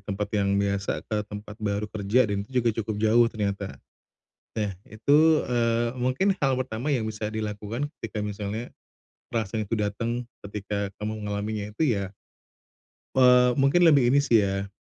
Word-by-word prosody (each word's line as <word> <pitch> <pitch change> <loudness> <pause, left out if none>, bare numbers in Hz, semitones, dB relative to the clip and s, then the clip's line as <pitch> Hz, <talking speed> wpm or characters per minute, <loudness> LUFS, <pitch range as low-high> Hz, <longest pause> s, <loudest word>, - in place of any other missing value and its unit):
tempat 100 +1 -4
yang 100 -2 +2
biasa 100 0 -1
ke 110 - -2
tempat 105 0 -8
baru 105 0 -1
kerja 105 +3 +1
dan 100 - 0
itu 125 -2 0
juga 115 - +4
cukup 110 0 -3
jauh 115 +2 +5
ternyata, 100 -3 -3 0.8
nah 105 -2 -1 0.2
itu, 150 +8 +4
eee, 115 -1 +1
mungkin 130 +11 +1
hal 135 -2 +2
pertama 130 +2 -2
yang 110 -4 0
bisa 110 0 -5
dilakukan 110 +5 -3
ketika 105 - -5
misalnya, 105 +3 -4 0.6
perasaan 110 -1 -2
itu 110 +2 -2
datang 115 +4 -2 0.2
ketika 100 0 -3
kamu 110 +1 -4
mengalaminya 105 0 -3
itu 160 - +2
ya. 100 -1 -3 1.0
Eee, 125 -1 +6
mungkin 140 +6 +4
lebih 135 -5 +5
ini 140 - +5
sih 115 -7 +4
ya, 100 0 -2
110 Hz, 155 wpm, -26 LUFS, 100-125 Hz, 1.0 s, Eee